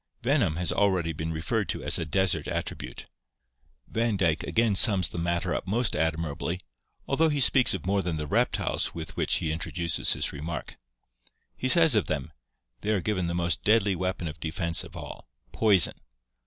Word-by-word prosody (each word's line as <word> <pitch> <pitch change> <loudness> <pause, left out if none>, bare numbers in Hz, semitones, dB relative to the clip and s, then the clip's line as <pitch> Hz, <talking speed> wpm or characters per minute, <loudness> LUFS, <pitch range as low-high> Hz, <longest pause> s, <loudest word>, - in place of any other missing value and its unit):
Venom 80 - +2
has 90 +1 0
already 90 -5 +1
been 80 +1 -4
referred 80 0 -2
to - - -3
as - - +1
a 80 - -2
desert 95 +4 0
attribute. - - -5 0.8
Van 115 -2 0
Dyke 85 -4 +1
again 115 -2 +2
sums 95 -3 +5
the 85 - -6
matter 85 0 -1
up - - -4
most 115 +4 +1
admirably, 80 +2 -2 0.5
although 160 +4 +2
he 145 -1 -1
speaks 130 -4 +4
of 90 - -7
more 100 +1 +1
than 85 -4 -3
the 75 - -3
reptiles 75 - 0
with 80 -2 -6
which - - +1
he 80 - -1
introduces 85 +1 0
his - - -2
re 70 - -7
mark. 80 -2 -6 0.8
He 130 - -2
says 160 -1 +7
of 105 -4 +2
them: 75 -1 -3 0.5
"They 105 - -4
are - - +1
given 95 -2 -1
the 85 - -2
most 85 0 0
deadly 105 -2 +3
weapon 90 -1 -3
of 75 0 -7
defense 85 +1 -1
of - - -11
all - - -9
— - - -40
poison. 100 -6 +4
85 Hz, 185 wpm, -27 LUFS, 80-105 Hz, 0.8 s, says